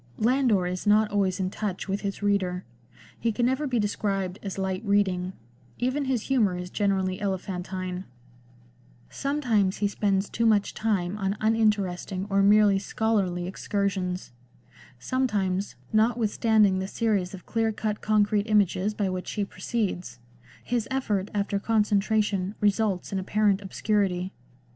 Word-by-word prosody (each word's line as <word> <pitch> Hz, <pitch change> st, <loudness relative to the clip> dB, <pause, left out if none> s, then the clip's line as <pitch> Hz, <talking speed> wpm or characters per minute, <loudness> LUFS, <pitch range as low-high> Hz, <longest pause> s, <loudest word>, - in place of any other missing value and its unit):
Landor 235 Hz, -, +3 dB
is 180 Hz, +3 st, -3 dB
not 210 Hz, +1 st, +4 dB
always 195 Hz, -2 st, +1 dB
in 185 Hz, 0 st, -1 dB
touch 205 Hz, -3 st, -4 dB
with 200 Hz, +1 st, -2 dB
his 200 Hz, 0 st, -4 dB
reader; 185 Hz, -3 st, +1 dB, 0.6 s
he 230 Hz, -, +1 dB
can 240 Hz, +2 st, 0 dB
never 265 Hz, +4 st, +1 dB
be 250 Hz, -2 st, 0 dB
described 200 Hz, -3 st, -1 dB
as 195 Hz, -2 st, -5 dB
light 190 Hz, +1 st, -2 dB
reading; 190 Hz, -3 st, +1 dB, 0.4 s
even 260 Hz, +3 st, 0 dB
his 255 Hz, -4 st, 0 dB
humour 215 Hz, -9 st, +2 dB
is 180 Hz, 0 st, -6 dB
generally 190 Hz, -2 st, 0 dB
elephantine; 185 Hz, -1 st, -3 dB, 1.1 s
sometimes 245 Hz, -9 st, 0 dB
he 205 Hz, -, +1 dB
spends 200 Hz, -1 st, 0 dB
too 230 Hz, 0 st, 0 dB
much 210 Hz, -2 st, +2 dB
time 205 Hz, -3 st, -1 dB
on 195 Hz, +1 st, -1 dB
uninteresting 205 Hz, -4 st, +1 dB
or 195 Hz, 0 st, +4 dB
merely 205 Hz, 0 st, +5 dB
scholarly 195 Hz, -4 st, 0 dB
excursions; 190 Hz, -3 st, -2 dB, 0.7 s
sometimes, 200 Hz, -, -1 dB, 0.2 s
not 220 Hz, +2 st, +3 dB
withstanding 215 Hz, -3 st, +3 dB
the 190 Hz, -, -3 dB
series 200 Hz, -4 st, 0 dB
of 180 Hz, -, -13 dB
clear 225 Hz, -1 st, 0 dB
cut 210 Hz, -1 st, -3 dB
concrete 210 Hz, 0 st, +2 dB
images 205 Hz, 0 st, +2 dB
by 205 Hz, -2 st, 0 dB
which 185 Hz, -1 st, -4 dB
he 205 Hz, -2 st, -1 dB
proceeds, 190 Hz, -, -3 dB, 0.5 s
his 240 Hz, -2 st, -1 dB
effort 210 Hz, -7 st, -1 dB
after 200 Hz, 0 st, 0 dB
concentration 210 Hz, -2 st, +1 dB
results 205 Hz, -3 st, +1 dB
in 195 Hz, -, 0 dB
apparent 205 Hz, +1 st, +1 dB
obscurity. 190 Hz, -2 st, -1 dB
205 Hz, 140 wpm, -26 LUFS, 190-215 Hz, 1.1 s, merely